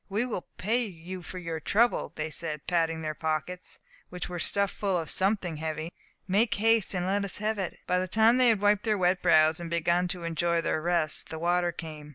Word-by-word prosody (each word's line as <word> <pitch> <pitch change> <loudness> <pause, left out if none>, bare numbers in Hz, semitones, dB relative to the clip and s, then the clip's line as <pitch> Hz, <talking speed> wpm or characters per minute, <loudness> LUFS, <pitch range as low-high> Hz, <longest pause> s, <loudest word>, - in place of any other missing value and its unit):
"We 210 +5 0
will 225 -7 -5
pay 230 +5 +1
you 185 -2 -7
for 180 +2 -8
your 165 -2 -4
trouble," 230 +9 +2 0.2
said 155 -2 -4
they, - - -43
patting 165 -2 +1
their 155 0 -2
pockets, 160 +4 -3 0.3
which 180 - -5
were 175 -1 -5
stuffed 200 +3 0
full 195 -3 0
of 165 -3 -2
something 190 -4 0
heavy; 160 +1 -4 0.4
"make 210 +5 +2
haste, 225 -1 +2
and 180 0 -1
let 200 +2 0
us 200 - -1
have 215 0 -1
it." 190 -3 -3
By 180 0 +1
the 185 - -2
time 220 +5 +4
they 255 -1 +5
had 215 -3 +2
wiped 205 -1 +3
their 215 -2 +1
wet 180 0 +2
brows, 160 -2 +5
and 170 -1 -6
begun 170 +1 +1
to 180 -1 -4
enjoy 170 +1 0
their 155 - -1
rest, 170 -2 0
the 160 - -5
water 175 +1 +1
came. 155 -3 -8
180 Hz, 215 wpm, -28 LUFS, 165-200 Hz, 0.4 s, they